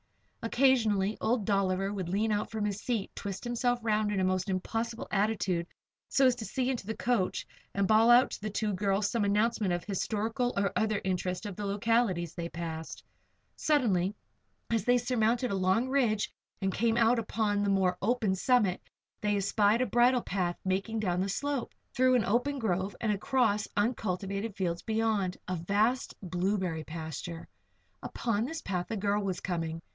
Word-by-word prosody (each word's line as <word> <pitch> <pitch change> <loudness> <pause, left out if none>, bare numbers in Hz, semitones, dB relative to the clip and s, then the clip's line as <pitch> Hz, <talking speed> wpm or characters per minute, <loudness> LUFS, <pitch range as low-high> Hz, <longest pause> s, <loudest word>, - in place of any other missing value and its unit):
Occasionally 225 -5 +3
old 225 -2 +1
Dolliver 195 -1 +1
would 185 -4 -4
lean 210 +4 +1
out 210 0 0
from 220 -2 -2
his 205 0 -2
seat, 230 -6 -2
twist 195 -1 -5
himself 240 0 0
around 215 -1 +1
in 200 - 0
a - - +1
most 185 +1 0
impossible 225 +5 -2
attitude 195 -4 0 0.4
so 270 - +4
as 255 - +6
to 225 - -5
see 260 +2 -1
into 235 -6 -5
the 220 - -2
coach, 235 -7 0 0.3
and 200 -1 +2
bawl 220 +2 +5
out 245 +2 +6
to - - -6
the 215 - -3
two 210 0 -1
girls 200 +1 0
some 230 -3 0
announcement 210 0 +1
of 175 0 0
the - - -19
historical 225 +5 -1
or 200 -1 +1
other 215 -2 +1
interest 185 +1 -2
of 205 -3 -5
the 205 +1 -4
localities 200 -4 +1
they 170 -1 -4
passed. 165 -1 -6 0.5
Suddenly, 210 - +1 0.6
as 225 -3 +1
they 245 +3 +4
surmounted 240 0 +1
a - - 0
long 190 +6 +2
ridge 240 -6 +1 0.3
and 195 -1 -1
came 230 +1 +1
out 235 +1 +4
upon 210 -2 0
the 205 - +1
more 190 -2 +2
open 220 -2 +1
summit, 200 -2 +2 0.4
they 210 -1 +1
espied 205 +3 +2
a - - +3
bridle 245 +2 +3
path 180 -2 -1
making 195 +4 -1
down 180 -3 0
the 195 - -1
slope, 285 +4 -2 0.2
through 255 0 +4
an 230 -5 +2
open 250 +7 +1
grove 190 -5 -1
and 220 - 0
across 210 -1 +1
uncultivated 205 -1 -1
fields 170 -3 -2
beyond 220 -4 0
a 185 - -1
vast 205 +9 0
blueberry 180 -2 -1
pasture. 160 +1 -6 0.5
Up - - -8 0.3
this 320 +2 -6
path 180 -2 -2
a 225 - -2
girl 205 +1 0
was 190 -2 -2
coming. 165 -3 -3
205 Hz, 175 wpm, -30 LUFS, 190-230 Hz, 0.6 s, as